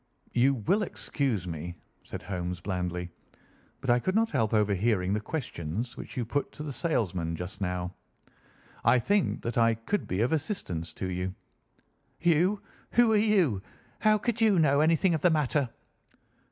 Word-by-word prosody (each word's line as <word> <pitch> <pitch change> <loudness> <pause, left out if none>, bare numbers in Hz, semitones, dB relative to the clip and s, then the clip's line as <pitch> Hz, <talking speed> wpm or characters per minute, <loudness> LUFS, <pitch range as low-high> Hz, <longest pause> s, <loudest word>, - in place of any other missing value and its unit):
"You 130 +3 +4
will 130 - +1
excuse 135 - -1
me," 85 +1 -5 0.3
said - - -7
Holmes 90 -1 -3
blandly, 90 -2 -3 0.7
"but 130 - +1
I 120 - +4
could 185 +9 -1
not 225 +1 +3
help 110 -2 +1
overhearing 105 -2 +2
the 105 - +1
questions 115 - -4
which - - -9
you 120 - 0
put 145 +5 -1
to 150 - -7
the 145 -2 -4
salesman 95 - -1
just 90 +4 -7
now. 90 -1 -2 0.9
I - - +5
think 195 - +1
that 120 +1 -1
I 115 0 +4
could 115 - -2
be 95 +3 -1
of 125 +6 +2
assistance 115 - -2
to 95 - -4
you." 90 +1 -3 0.8
"You? 175 +4 +2 0.3
Who 240 -2 +5
are - - +4
you? 195 - +3 0.4
How 215 0 +4
could 235 +1 -2
you 215 -4 +5
know 145 -3 +4
anything 165 +3 +3
of 160 - 0
the 180 - +5
matter?" 150 -4 +1
120 Hz, 165 wpm, -29 LUFS, -, 0.9 s, I